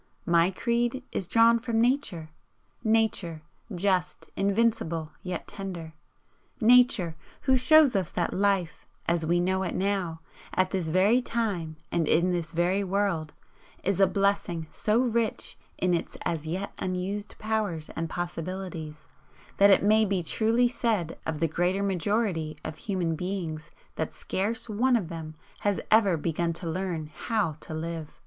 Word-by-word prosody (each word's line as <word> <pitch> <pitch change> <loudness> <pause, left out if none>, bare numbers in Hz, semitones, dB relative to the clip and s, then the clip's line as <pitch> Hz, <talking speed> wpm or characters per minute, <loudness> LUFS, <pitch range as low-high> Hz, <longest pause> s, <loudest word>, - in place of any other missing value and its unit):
My 170 +1 +4
creed 235 +5 -1
is 185 - -3
drawn 230 +2 +5
from 230 -1 -1
Nature 225 - 0 0.5
Nature, 215 -8 +1 0.3
just, 180 -1 0
invincible, 195 -6 0
yet 180 -2 -5
tender 185 -6 -6 0.7
Nature, 230 -8 +5 0.3
who 265 -1 +3
shows 265 +1 +6
us 185 -4 0
that 175 - -1
Life, 195 -4 0 0.2
as 170 -2 +1
we 175 +1 +3
know 190 +2 +1
it 180 -3 -2
now, 185 -4 -1 0.3
at 185 0 +2
this 180 -4 -1
very 200 +9 +4
time 200 -10 -2
and 165 -3 +1
in 170 +4 +3
this 170 -2 -2
very 180 +4 +1
world, 190 -5 -1 0.5
is 195 0 0
a 195 - +6
blessing 195 -5 0
so 215 +2 +1
rich 235 -3 0 0.2
in 180 -1 +1
its 170 - -2
as 160 -2 -2
yet 185 +5 -3
unused 190 +3 -3
powers 210 -8 -2
and 165 0 -4
possibilities, 175 -2 -5 0.5
that 200 +1 +7
it 195 - +5
may 215 +2 +5
be 195 -4 0
truly 225 +7 +2
said 220 -9 -1
of 160 -2 -2
the 165 - +2
greater 180 +5 0
majority 190 -5 0
of 155 - -5
human 180 -5 -1
beings 165 -3 -4 0.3
that - - -3
scarce 225 +5 -2
one 240 +4 +2
of 195 -8 -1
them 160 -2 -7 0.2
has 205 -2 0
ever 205 -6 +5
begun 170 +2 -1
to 165 +1 -6
learn 170 -2 -2
HOW 170 +5 -1
to 160 - -7
live. 160 -1 -5
185 Hz, 150 wpm, -27 LUFS, 165-215 Hz, 0.7 s, that